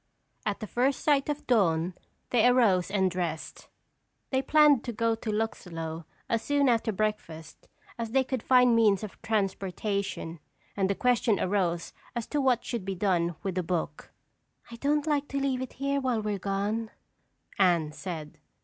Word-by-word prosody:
At 205 +2 -2
the - - -3
first 255 +5 0
sign 290 -2 +4
of 295 0 -3
dawn 180 -7 +2 0.4
they 245 -1 +5
arose 220 -8 +4
and 190 -2 +1
dressed. 170 -3 -4 0.6
They 265 -1 +2
planned 295 -2 +5
to 240 - -2
go 230 0 +1
to 225 0 -5
Luxlow 165 -7 -4 0.2
as 230 -1 0
soon 285 0 +2
after 230 -1 +2
breakfast 190 -7 -4 0.3
as 230 -1 -2
they 265 +3 +3
could 260 -2 -3
find 250 -1 +5
means 215 -3 +4
of 210 - -8
transportation 200 -4 -2 0.4
and 195 -1 +1
the 200 - +1
question 235 -4 +2
arose 180 -3 0 0.2
as 235 -2 -2
to 295 - 0
what 255 -3 +2
should 235 -5 -3
be 195 0 -3
done 175 -3 +1
with 195 - -2
the 185 - 0
book. 165 -4 -3 0.6
"I 235 - -8
don't 290 +4 +1
like 290 -2 0
to 275 - -2
leave 270 -2 0
it 260 - -6
here 275 +1 -1
while 245 -4 0
we're 210 -2 -2
gone," 205 +4 -2 0.7
Anne 170 -5 +3
said. 155 -3 -7
215 Hz, 165 wpm, -28 LUFS, 185-250 Hz, 0.7 s, they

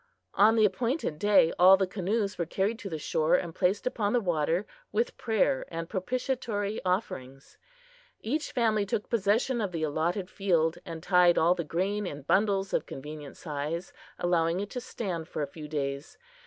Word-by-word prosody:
On 215 +3 +5
the 220 -1 +5
appointed 230 - -1
day 205 -5 +4
all 185 +2 +8
the 190 - +1
canoes 200 +1 -2
were 170 - -1
carried 200 +7 -1
to 200 - -6
the 160 - -3
shore 155 +2 +1
and 170 -2 -2
placed 190 +5 +1
upon 220 -5 0
the 245 - +4
water 170 -1 0 0.3
with 470 - 0
prayer 215 - +1
and 165 0 -5
propitiatory 220 0 -2
offerings. 135 - -3 0.6
Each 295 +7 -2
family 220 -4 +2
took 200 +1 -3
possession 230 +3 +1
of 200 -3 -2
the 165 -2 -3
allotted 165 +5 -1
field, 170 -5 +1
and 165 -1 -7
tied 180 -2 +5
all 170 +2 +5
the 175 -2 -3
grain 190 +6 -1
in 145 -4 -7
bundles 195 +3 +1
of - - 0
convenient 150 +1 -8
size, 155 +3 -4 0.2
allowing 170 0 +1
it 205 0 -4
to 250 - -4
stand 180 -9 -4
for 150 - -3
a - - -2
few 150 +2 -9
days. 140 0 -4
185 Hz, 175 wpm, -29 LUFS, 160-210 Hz, 0.6 s, all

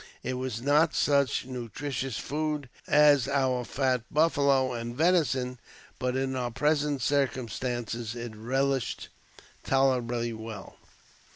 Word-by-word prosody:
It 130 - -2
was 125 -2 -4
not 150 +4 +3
such 140 -3 +2
nutritious 130 0 -4
food 150 -2 -3 0.2
as 145 -3 +5
our 130 -3 +1
fat 130 0 0
buffalo 140 -4 +3
and 120 0 -5
venison, 135 -6 +1 0.4
but 125 0 -1
in 130 0 -1
our 125 -1 -1
present 145 +1 0
circumstances 120 -4 -1
it 120 -2 -6
relished 135 +3 -1 0.5
tolerably 120 -3 +1
well. 110 -2 -8
130 Hz, 110 wpm, -28 LUFS, 120-140 Hz, 0.5 s, as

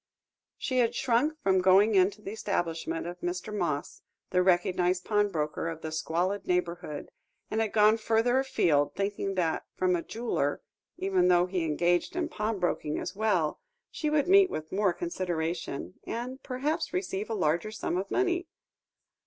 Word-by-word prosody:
She 255 -1 -1
had 240 -1 +2
shrunk 265 +6 +1
from 190 -1 +3
going 195 +4 +5
into 200 +2 +3
the 195 - -5
establishment 165 -6 -2
of 175 +1 -6
Mr. 180 +5 -4
Moss, 155 -7 -2 0.3
the 180 - +3
recognised 180 0 +2
pawnbroker 185 -8 0
of 160 -1 -6
that 160 - -4
squalid 175 +5 -1
neighbourhood, 175 -4 -2 0.4
and 220 - +1
had 220 -2 0
gone 215 +1 +5
further 230 +3 +2
afield, 160 - +2
thinking 195 0 -2
that 165 -3 0
from 185 -1 +2
a 170 - -1
jeweller, 220 -10 -2 0.3
even 190 -2 +2
though 175 -1 +5
he 180 -2 -2
engaged 175 - +1
in 345 -3 -1
pawnbroking 200 - -1
as 185 - -4
well, 195 -8 +1 0.3
she 305 - -2
would 300 0 +2
meet 390 0 +6
with 155 0 -5
more 200 -1 +2
consideration, 170 - -3
and 250 +3 -4
perhaps 290 +6 -2
receive 190 +3 -2
a 225 - -1
larger 170 +1 +1
sum 215 -4 -3
of 190 +2 -2
money. 360 -2 0
190 Hz, 155 wpm, -29 LUFS, 175-220 Hz, 0.4 s, meet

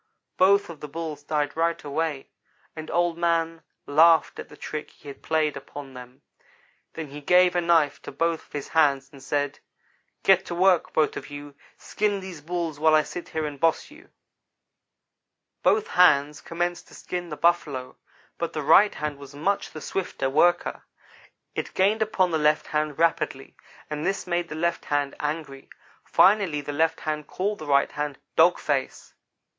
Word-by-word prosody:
"Both 200 +2 +4
of 160 - -12
the 150 - -7
Bulls 155 -1 -6
died 145 -1 -2
right 165 +1 0
away, 145 -1 -3 0.5
and 155 -1 -7
Old 175 -1 0
man 165 -1 0 0.2
laughed 160 +2 +4
at - - -8
the 150 - -14
trick 155 0 -6
he - - -19
had 140 - -11
played 155 -2 0
upon 140 0 -9
them. 125 0 -12 0.7
Then 160 -3 -6
he 145 +2 -9
gave 180 +3 +4
a 175 - +2
knife 165 -4 +2
to - - -8
both 165 +3 -1
of - - -34
his 145 -1 -5
hands, 140 -4 +2
and 140 - -14
said: 145 +1 -2 0.6
"'Get 190 -1 +5
to 175 - -4
work, 185 -1 +3
both 155 - +1
of - - -8
you! 145 0 -9 0.2
Skin 205 -1 -1
these 185 -5 -9
Bulls 165 -2 -3
while 155 0 +5
I 155 - +4
sit 175 - -8
here 160 -1 -2
and 145 -2 -6
boss 165 - +1
you.' 320 +6 -16 1.5
"Both 430 +1 +2
hands 150 -5 +4
commenced 175 +1 -3
to - - -15
skin 175 -1 -5
the 150 - -6
Buffalo, 150 -6 0 0.4
but 170 - -3
the 155 - -3
right 180 +8 +5
hand 150 -1 -4
was 140 0 -12
much 195 +7 -1
the 155 - -9
swifter 135 -8 -3
worker. 175 +5 +2 0.7
It - - -5
gained 205 +4 +2
upon 190 -4 +1
the 160 - +1
left 150 0 +2
hand 150 -1 -2
rapidly, 165 -4 0 0.3
and 150 0 -4
this 195 +3 -1
made 175 -1 -1
the - - -6
left 170 +2 -1
hand 145 -1 -1
angry. 150 -3 -5 0.3
Finally 190 -7 +3
the 145 +1 -6
left 160 +2 +1
hand 150 -1 -3
called 205 +3 -2
the 155 - -8
right 140 -1 +3
hand 145 -1 -4 0.2
'dog - - +5
face.' - - -3
160 Hz, 175 wpm, -25 LUFS, 145-175 Hz, 1.5 s, Get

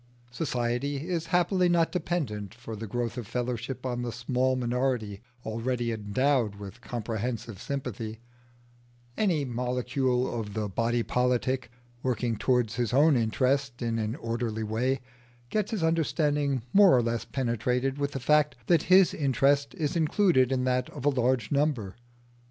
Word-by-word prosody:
Society 135 +1 -2
is 170 -3 -2
happily 180 +1 +2
not 170 -1 +3
dependent 130 - -3
for 115 -1 -8
the 110 +1 -6
growth 120 +3 -2
of 115 - -7
fellowship 125 +2 -3
on 125 -1 -2
the 120 -1 -3
small 125 +2 0
minority 125 -4 -1 0.2
already 115 +2 -1
endowed 110 +1 +1
with 100 +4 -10
comprehensive 115 -2 -4
sympathy: 115 -5 -4 1.0
any 170 -9 +1
molecule 125 +1 0
of 105 -2 -6
the 110 -1 -1
body 115 +4 0
politic 125 +1 0 0.3
working 120 -2 0
towards 120 -1 +1
his 120 -1 -1
own 150 +2 +5
interest 130 +3 +1
in 115 -1 -1
an 110 +2 -2
orderly 115 -4 -3
way 120 +5 0 0.5
gets 215 -2 0
his 215 -7 -2
understanding 145 -4 +1
more 195 -7 +7
or 120 - +2
less 115 0 -1
penetrated 125 +2 -1
with 140 0 -1
the 135 - -3
fact 150 +3 +3
that 170 +4 +4
his 185 0 +6
interest 140 +1 +2
is 155 -4 -2
included 160 - +3
in 130 -1 +1
that 125 0 0
of 145 -3 -8
a - - +6
large 125 -4 +1
number. 140 -9 0
125 Hz, 145 wpm, -28 LUFS, 115-140 Hz, 1.0 s, more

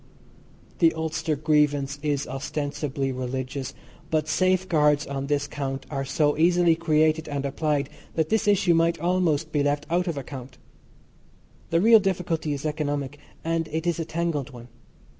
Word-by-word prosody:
The 165 -2 +4
Ulster 160 0 -1
grievance 145 -1 +1
is 145 -2 -1
ostensibly 140 0 -3
religious; 130 +1 -4 0.3
but 155 -1 0
safeguards 160 -4 +2
on 140 0 -4
this 145 0 0
count 135 -2 -4
are 135 -1 -2
so 145 +1 +1
easily 175 0 +4
created 160 -1 +2
and 140 -1 -2
applied 145 0 0 0.3
that 160 -1 0
this 220 -1 +1
issue 190 -4 +4
might 165 0 +2
almost 165 -3 +1
be 150 - +1
left 145 +1 0
out 180 +2 +1
of 165 -4 -2
account. 130 -1 -8 1.1
The 165 +1 +2
real 225 +2 +7
difficulty 180 -5 -1
is 145 +1 -4
economic, 145 -2 -2 0.2
and 165 0 -1
it 160 +2 -2
is 170 -1 0
a 165 - -2
tangled 160 -4 -2
one. 120 -2 -12
150 Hz, 150 wpm, -25 LUFS, 140-165 Hz, 1.1 s, real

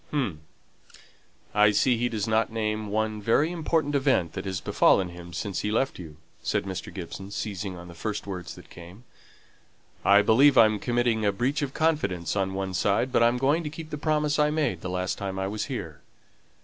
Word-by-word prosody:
"Hum! 125 - -2 1.1
I 105 0 +5
see 120 +4 +3
he 120 +1 0
doesn't 110 0 0
name 110 -1 -2
one 110 +1 -1
very 145 +10 +2
important 160 -3 0
event 135 - +2
that 95 0 -5
has 95 -2 -2
befallen 95 +2 +3
him 85 0 -10
since 95 +2 -3
he 105 - -2
left 115 +3 0
you," 80 -4 -10 0.2
said - - -1
Mr. 95 -2 -6
Gibson, 95 +2 -7
seizing 100 -2 -4
on 90 0 -10
the 85 - -11
first 105 +5 -4
words 90 -5 -6
that - - -15
came. 90 +6 -12 1.0
"I 100 +1 +6
believe 130 +6 +5
I'm 110 -2 +6
committing 120 -2 0
a 100 - +3
breach 130 +8 -1
of 140 -2 -3
confidence 100 - 0
on 95 -1 -1
one 95 -1 -3
side; 100 +7 +1
but - - +3
I'm 120 +1 +4
going 145 +6 +2
to 150 - -3
keep 160 +1 -9
the 150 - -3
promise 150 0 +1
I 150 0 +4
made 145 - -1
the 90 - -4
last 90 +1 -2
time 95 -1 -4
I 95 - -1
was 105 +2 -3
here. - - -6
105 Hz, 195 wpm, -26 LUFS, 95-135 Hz, 1.1 s, I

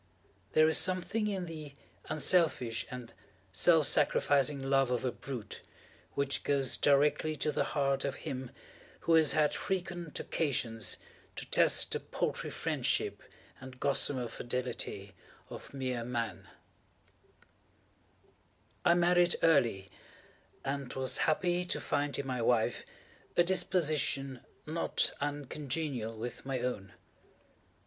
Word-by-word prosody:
There 155 0 +6
is 160 - +5
something 185 +4 0
in 195 -3 -2
the 155 -4 -8 0.3
unselfish 150 -9 +1
and 125 -3 -8 0.4
self 160 - +4
sacrificing 145 -1 +2
love 135 -1 +2
of 125 0 -1
a 125 - +1
brute, 120 -7 -7 0.5
which 140 0 0
goes 140 -2 +2
directly 150 +2 +3
to 150 +1 -1
the - - +1
heart 140 -1 +1
of 140 -1 -2
him 130 -4 -4 0.5
who 165 - +2
has 160 -2 +6
had 150 -2 +3
frequent 175 -4 -3
occasion 120 -7 -1 0.5
to - - -6
test - - +4
the - - -1
paltry - - -3
friendship - - 0 0.4
and 130 -1 -11
gossamer 135 -2 +1
fidelity 125 +2 -4 0.4
of - - -9
mere 130 -3 -3
Man. 115 -6 -3 2.4
I 170 -1 +5
married 175 0 +4
early, 115 -12 +3 0.7
and 135 -2 -3
was 130 -1 +1
happy 175 +3 +1
to - - -2
find 145 0 -1
in 140 - -3
my 130 -2 -2
wife 115 -1 +1 0.5
a 175 - +7
disposition 150 -7 +1 0.3
not 160 +2 0
uncongenial 140 -4 -3
with 120 +2 -6
my 135 -1 -2
own. 105 -7 -4
140 Hz, 120 wpm, -32 LUFS, 125-160 Hz, 2.4 s, a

